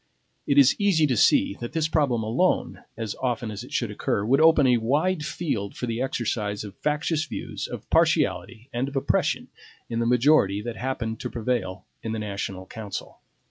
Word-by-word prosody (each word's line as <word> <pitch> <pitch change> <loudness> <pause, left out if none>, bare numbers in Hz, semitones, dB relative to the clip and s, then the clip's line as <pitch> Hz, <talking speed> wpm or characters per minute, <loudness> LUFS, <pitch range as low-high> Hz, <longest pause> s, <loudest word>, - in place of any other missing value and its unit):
It 140 - +2
is 140 -1 +7
easy 185 -6 +4
to 130 -4 +1
see 100 -1 +3
that 120 - -6
this 160 -2 +1
problem 140 -8 +1
alone, 125 +13 0
as 110 -3 -4
often 120 -3 -1
as 105 - -6
it - - -12
should - - -1
occur, 100 - -1
would 135 +6 +3
open 160 -3 +6
a 125 -2 +5
wide 150 +9 +1
field 135 - -3
for - - -2
the 115 0 -2
exercise 110 -6 -2
of 105 -2 -8
factious 150 +1 0
views, - - -5
of - - -8
partiality, 120 +1 +1
and 120 +3 -1
of 140 - -8
oppression, 135 - 0 0.4
in 115 - -1
the 115 - +1
majority 120 -5 +4
that 120 -1 -5
happened 115 -3 -3
to - - -4
prevail 115 -5 -2 0.2
in 110 - -4
the - - -2
national 100 -3 -4
council. 105 -1 -7
120 Hz, 185 wpm, -25 LUFS, 110-145 Hz, 0.4 s, is